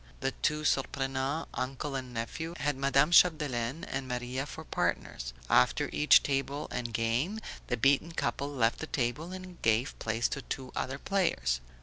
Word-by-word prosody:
The - - 0
two 150 0 +1
Surprenants, 135 +2 0
uncle 135 +2 -3
and 130 -2 -4
nephew, 160 +9 -4
had 145 -1 0
Madame 140 +3 +3
Chapdelaine 150 -5 +3
and 135 -4 -4
Maria 125 +2 -3
for 160 - -8
partners; - - -2 0.2
after - - +3
each 150 - +6
game 135 - -1 0.3
the 125 - 0
beaten 140 +7 +3
couple 140 -3 -1
left 120 -5 +1
the 160 - -4
table 135 +7 -2
and 185 -1 -9
gave 115 +4 +1
place 115 +2 0
to 140 - -3
two 130 -1 -5
other 130 +1 -2
players. 165 - 0
135 Hz, 145 wpm, -31 LUFS, 125-150 Hz, 0.3 s, each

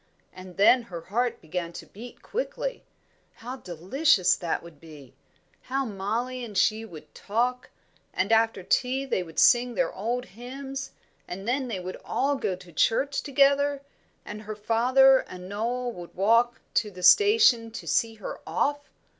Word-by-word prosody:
And 185 -1 -12
then 245 +5 +6
her 180 -8 -8
heart 235 +8 -2
began 170 +1 -4
to - - -9
beat 235 +4 -12
quickly. - - -4 0.5
How 250 +3 -8
delicious 185 - +2
that 170 -2 -3
would 170 -4 -14
be! 150 -5 -13 0.5
How 270 +1 -2
Mollie 230 +5 -3
and 215 -4 -6
she 220 +1 +2
would 170 -8 -12
talk! 245 +4 -2 0.4
And 190 +4 -1
after 225 -3 +2
tea 260 +7 0
they 260 - -1
would 165 -3 -10
sing 245 -1 +4
their - - 0
old 240 +5 -3
hymns, 265 +6 -7 0.4
and 195 +4 -7
then 260 +2 0
they 215 -6 -4
would 185 +1 -6
all 280 +2 0
go 195 -8 -2
to 180 -1 -15
church 275 - +1
together, 280 0 +2 0.4
and 210 +1 -7
her 215 0 -7
father 255 +5 +4
and 180 0 -9
Noel 240 +5 -2
would 175 -6 -11
walk 230 +5 +2
to 210 - +1
the 180 -2 -11
station 410 - +5
to 225 - -8
see 225 -1 0
her 215 - -7
off. 290 0 0
230 Hz, 160 wpm, -26 LUFS, 190-260 Hz, 0.5 s, then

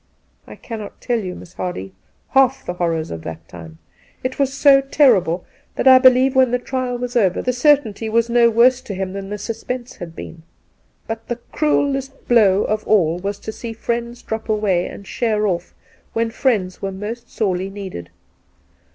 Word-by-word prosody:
I - - -10
cannot 220 -3 -8
tell 240 -2 -1
you, 185 -4 -5
Miss 180 - -12
Hardy, 95 - -5 0.4
half 265 0 +3
the 180 - -3
horrors 165 -3 -2
of 80 - -6
that 80 0 -8
time. 80 -3 -11 0.5
It 255 +2 -3
was 275 -1 +2
so 280 0 +5
terrible 215 - +3 0.3
that - - 0
I 260 0 +9
believe 255 0 +5
when 260 -1 +5
the 250 - +1
trial 250 0 -3
was 245 +1 -5
over 195 -7 +2
the 250 - -1
cer 290 +4 +5
tainty 220 -4 -7
was 230 +1 +2
no 235 0 +4
worse 245 +3 +4
to 200 - -6
him 190 0 -3
than 195 0 -6
the 210 - -4
suspense 240 +3 -5
had 165 -2 -8
been. 165 - -9 0.6
But 225 0 -6
the 240 - -2 0.2
cruellest 275 -2 -1
blow 210 -5 +4
of 215 0 -1
all 175 -5 +3
was 200 +2 -3
to - - -5
see 230 +1 -7
friends 235 +1 -4
drop 220 0 -5
away 205 -5 +1
and 200 - -10
sheer 215 -1 0
off 175 -3 -2 0.4
when 230 0 0
friends 210 -7 0
were 195 - -2
most 210 +5 -6
sorely 190 -3 -1
needed. 190 - -7
225 Hz, 185 wpm, -20 LUFS, 190-250 Hz, 0.6 s, I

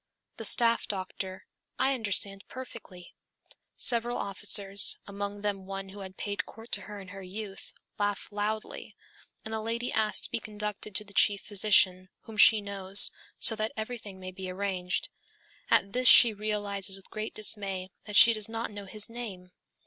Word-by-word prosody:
The - - -4
staff 235 -1 +3
doctor, 190 -1 -5 0.3
'I 265 +1 +2
understand 205 -4 -2
perfectly.' 230 -8 -10 0.6
Several 240 0 +2
officers, 200 0 +3
among 200 0 -5
them 200 -2 -3
one 195 0 -5
who 200 +1 -11
had 190 -1 -8
paid 205 -1 -3
court 225 +2 -12
to - - -1
her 210 -1 -8
in 190 -1 -11
her 195 0 -9
youth, 195 +1 -8 0.3
laugh 205 -1 -1
loudly, 210 +1 -4 0.5
and 220 - -6
the 220 - -2
lady 230 +2 -2
asks 215 -1 +1
to - - -2
be - - -1
conducted 210 -1 -5
to 210 - 0
the 205 -1 -15
chief 200 0 +4
physician, 185 -3 +3
whom 225 - -11
she 215 +1 +7
knows, 200 -1 +4 0.3
so 225 - +6
that 215 0 -2
everything 220 -3 -6
may 185 0 -7
be 185 0 -7
arranged. 185 -1 -2 0.6
At 195 - +3
this 250 +1 +1
she 235 -2 +9
realizes 205 -2 -2
with 195 - -7
great 215 0 -4
dismay 195 -3 -2
that 210 -1 -6
she 230 - +8
does 215 -1 -2
not 225 0 -4
know 205 -1 -8
his 210 +2 -1
name. 205 -7 -7
205 Hz, 170 wpm, -29 LUFS, 195-220 Hz, 0.6 s, she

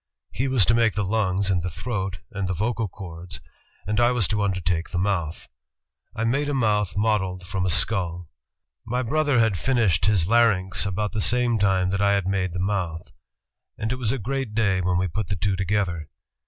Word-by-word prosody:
He 130 +5 -1
was 130 -7 +3
to - - +3
make 115 -1 +2
the 105 - 0
lungs 100 -1 0
and 90 -2 +1
the 90 - -3
throat, 95 0 -4
and 100 -3 -3
the 95 - -2
vocal 115 +3 -1
chords, 90 -2 -9 0.5
and 105 +2 -1
I 120 0 +5
was 120 -6 +1
to 105 0 0
undertake 90 -4 -1
the 90 - -4
mouth.... 90 -4 -1 0.7
I 115 - -2
made 140 +6 0
a 145 - -1
mouth 105 -6 +1
modeled... 95 -4 0
from 95 0 -2
a - - +1
skull.... 90 -2 +1 0.6
My 125 +2 -2
brother 145 +1 +1
had 110 -2 +3
flnished 105 -3 +2
Ciis 95 -6 +3
larynx 100 -4 +3
about 105 +2 -2
the 110 - -2
same 120 0 +3
time 95 -2 +2
that 100 +1 -1
I 100 0 +4
had 100 -2 0
made 95 -2 -1
the 90 - -3
mouth, 90 -4 -2 0.7
and 110 +1 -3
it - - -4
was 120 -4 0
a 135 - -1
great 130 0 -3
day 100 -5 +2
when 90 0 +1
we 95 +1 +1
put 90 +4 -3
the 100 - -2
two 95 +1 0
to 95 - -1
gether. 90 -7 -1
100 Hz, 210 wpm, -24 LUFS, 90-115 Hz, 0.7 s, I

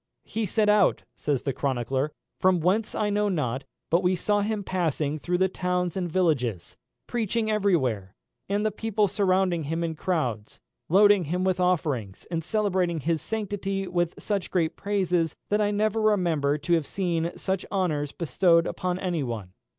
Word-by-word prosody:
"He 220 -1 -2
set 215 +3 +1
out," 210 -2 +4
says 145 -4 -1
the 135 - -1
chronicler, 130 +2 -1 0.3
"from 185 -1 +4
whence 190 +7 +1
I 210 -1 0
know 205 0 +1
not; 135 -7 -1 0.3
but 170 +2 +4
we 185 0 +2
saw 205 +3 +1
him 210 0 -1
passing 155 -5 -1
through 180 +4 -1
the 190 +1 +3
towns 180 -2 -1
and 180 -3 -2
villages, 125 - 0 0.3
preaching 225 -1 -1
every 205 -3 +3
where, 110 - -2 0.3
and 205 +2 0
the 215 - +2
people 215 0 0
surrounding 185 -4 +1
him 165 +3 -2
in 165 -1 -1
crowds, 135 - -2 0.3
loading 200 +1 +5
him 180 +5 -1
with 185 -1 +1
offerings, 150 - 0
and 165 -1 -1
celebrating 185 -4 0
his 160 +2 0
sanctity 195 -3 -3
with 175 -1 0
such 200 -4 -2
great 165 -4 0
praises, 180 -5 0
that 210 +1 +2
I 205 - +2
never 215 +1 +1
remember 170 -9 +2
to 150 +3 -1
have 160 -4 +2
seen 170 -3 -1
such 190 -1 -2
honours 155 -7 0
bestowed 170 0 +3
upon 180 0 -2
any 180 -4 -1
one." 110 -8 -5
180 Hz, 170 wpm, -26 LUFS, 155-200 Hz, 0.3 s, loading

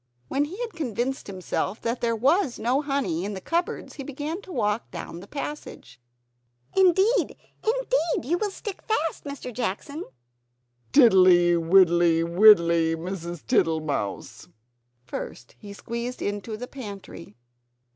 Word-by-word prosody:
When 285 +2 +1
he 365 +8 -9
had 470 -2 -4
convinced 260 - -3
himself 195 +2 -3
that 235 +1 -2
there 230 -1 +1
was 275 - +2
no 255 +5 +1
honey 270 - -1
in 205 +1 -4
the - - -5
cupboards, 335 - -2
he 275 - -7
began 295 +6 -5
to 380 - -12
walk 215 -6 -1
down 170 -1 -7
the 190 - -12
passage. 280 - -7 0.7
"Indeed, 385 +5 +3 0.3
indeed, 450 - 0
you 345 +4 +1
will 425 - 0
stick 400 0 -7
fast, 330 -10 -2
Mr. 280 -3 -6
Jackson!" 250 - -4 0.9
"Tiddly, 185 -9 +6
widdly, 170 -1 +4
widdly, 170 -3 +5
Mrs. 170 -1 -6
Tittlemouse!" 160 - -1 0.6
First 120 0 -7
he 205 - -10
squeezed 235 +4 -5
into 205 +2 -3
the 245 - -5
pantry. 200 - -9
230 Hz, 130 wpm, -25 LUFS, 175-290 Hz, 0.9 s, Tiddly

